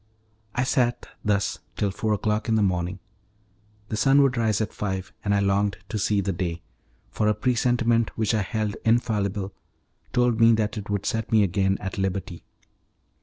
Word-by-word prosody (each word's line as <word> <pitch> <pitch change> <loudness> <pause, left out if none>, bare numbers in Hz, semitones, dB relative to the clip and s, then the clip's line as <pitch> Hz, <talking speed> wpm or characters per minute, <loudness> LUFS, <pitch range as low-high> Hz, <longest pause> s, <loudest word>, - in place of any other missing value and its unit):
I 125 - +2
sat 125 -2 0 0.2
thus 100 -2 0 0.2
till 100 -2 0
four 110 +2 -1
o'clock 105 +2 -1
in 110 - +3
the 110 - +3
morning, 90 -1 0 0.9
the - - -2
sun 135 +6 +5
would 135 -2 +2
rise 110 -4 +1
at 110 - -2
five, 95 -2 -4
and 100 - 0
I 100 - +3
longed 100 0 +1
to 110 - -2
see 105 0 +2
the 100 0 -1
day, 85 -2 -3 0.5
for 105 - 0
a 105 - +3
presentiment 120 0 +1
which 110 -1 +1
I 110 - +2
held 105 0 -2
infallible 105 -4 0 0.6
told 125 -2 +2
me 115 0 +7
that 110 -1 0
it 105 -2 -6
would 100 -1 -1
set 115 -2 -2
me 110 -2 +5
again 95 +1 +1
at 95 0 -5
liberty. 95 -3 -3
105 Hz, 175 wpm, -25 LUFS, 100-115 Hz, 0.9 s, me